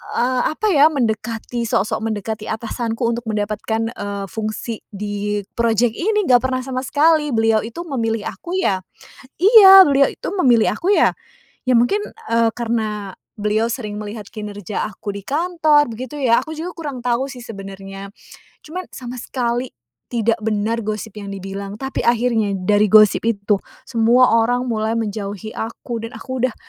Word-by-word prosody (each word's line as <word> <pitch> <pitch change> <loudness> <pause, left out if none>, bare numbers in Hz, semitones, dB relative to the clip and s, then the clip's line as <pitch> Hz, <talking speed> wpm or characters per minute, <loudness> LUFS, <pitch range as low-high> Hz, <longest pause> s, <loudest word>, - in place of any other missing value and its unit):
eee, 250 0 +1
apa 430 +6 -1
ya, 295 -1 +6
mendekati, 235 -3 -2
sok-sok 210 +1 0
mendekati 215 0 -4
atasanku 230 +1 -3
untuk 235 0 -1
mendapatkan, 215 +2 -2
eee, 200 -2 -5
fungsi 220 +1 -4
di 205 0 -3
project 230 0 +2
ini. 420 +3 +1
Nggak 245 -1 +7
pernah 255 0 -1
sama 255 -1 -3
sekali. 300 -1 +3
Beliau 225 -1 +3
itu 335 +10 -6
memilih 225 -8 -2
aku 350 +1 -7
ya 190 - +1 0.6
iya, 390 -2 +10
beliau 275 -1 +4
itu - - -8
memilih 250 - +4
aku 380 - +1
ya, - - +4 0.6
ya 255 - +4
mungkin, 400 - +2 0.3
eee, 230 -1 +3
karena 215 -4 -2 0.2
beliau 210 +2 +1
sering 215 -4 -4
melihat 210 -1 -7
kinerja 210 -2 -5
aku 205 0 -6
di 200 - -7
kantor, 310 -2 +2
begitu 255 +5 -7
ya. 235 -3 +4
Aku 315 - -9
juga 345 +3 -5
kurang 290 -6 -5
tahu 245 +2 0
sih 250 - -10
sebenarnya. 195 -1 -9 0.5
Cuman, 360 +4 -6
sama 250 -1 -7
sekali 245 0 -2 0.4
tidak 230 0 +1
benar 220 +1 0
gosip 215 0 -5
yang 200 -1 -7
dibilang, 195 +1 -6
tapi 265 0 -4
akhirnya 230 -4 +2
dari 205 +3 +2
gosip 215 -1 +6
itu 205 -2 +1 0.3
semua 240 +1 +4
orang 245 +2 +1
mulai 220 0 -1
menjauhi 210 -1 -4
aku 230 0 -5
dan 230 - -11
aku 260 -2 -4
udah 255 - 0
230 Hz, 155 wpm, -20 LUFS, 210-255 Hz, 0.6 s, iya